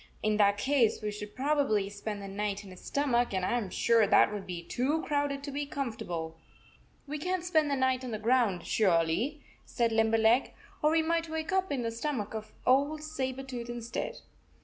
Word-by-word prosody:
In 215 -1 +2
that 200 -1 +4
case, 255 -1 +2
we 210 - -1
should 210 0 -8
probably 275 -6 +2
63 195 - -6
spend 205 0 -5
the - - -6
night 205 +1 -3
in 195 - -11
his 185 - -12
stomach, 245 -6 +1
and 185 -1 0
I - - 0
am 205 -5 -5
sure 230 +2 +3
that 205 0 +5
would 205 -2 -5
be 175 -2 -5
too 270 - -1
crowded 285 -2 -1
to 285 - -5
be 285 +1 -3
com 275 -5 -3
fortable." 165 -5 -5 0.4
" - - -32
We 300 +1 -4
can 365 +3 -1
t - - -10
spend 315 -4 +2
the 280 - +1
night 260 -1 +1
on 255 - -4
the 220 - -3
ground 220 -5 +2
surely," 195 - +1 0.2
said 235 -2 0
Limberleg. 225 +2 +3 0.3
"Or 300 - +4
we 320 0 +3
might 330 0 0
wake 315 +1 -3
up 380 -2 +1
in 265 -4 -1
the 230 - -1
stomach 230 -3 -3
of 220 -1 -6
old 285 +4 +3
Saber 270 -4 -3
tooth 245 -3 -6
instead." 240 0 -4
240 Hz, 215 wpm, -30 LUFS, 210-285 Hz, 0.4 s, that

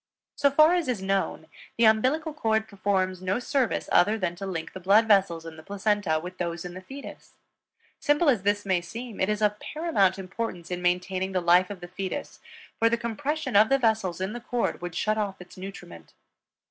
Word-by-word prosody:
So 280 - +3
far 310 +4 +5
as 350 -4 0
is 245 -5 -1
known; 195 -4 -1 0.3
the 230 - +4
umbilical 260 +9 +3
cord 220 -6 0
performs 190 -2 -1
no 185 +3 0
service 255 -1 -1
other 205 +5 +4
than 185 -4 -2
to 195 - -5
link 165 -4 -5
the 190 - -7
blood 200 +5 +4
vessels 190 -6 +3
in 160 -1 -9
the - - -10
placenta 200 -3 0
with 180 +3 -9
those 170 -1 -3
in 175 - -6
the 185 - -8
fetus. 270 +8 -11 0.7
Simple 295 +3 +2
as 245 -8 +4
this 205 +1 0
may 185 -3 +1
seem, 230 +5 -8
it 190 - +1
is 210 0 0
of 210 0 +1
paramount 295 - +1
importance 185 -2 -5
in 180 0 -3
maintaining 185 +1 0
the 185 - +2
life 180 +1 +4
of 200 -3 -8
the 175 - -7
fetus, 185 +1 -5 0.4
for 230 - +4
compression 265 +4 -3
of 215 +2 +6
the 275 - +4
vessels 220 -8 0
in 190 +3 -2
the 240 - -6
cord 240 -4 -2
would 175 -2 -6
shut 215 +4 0
off 200 -2 -3
its 180 0 -13
nutriment. 185 - -10
200 Hz, 200 wpm, -26 LUFS, 180-230 Hz, 0.7 s, of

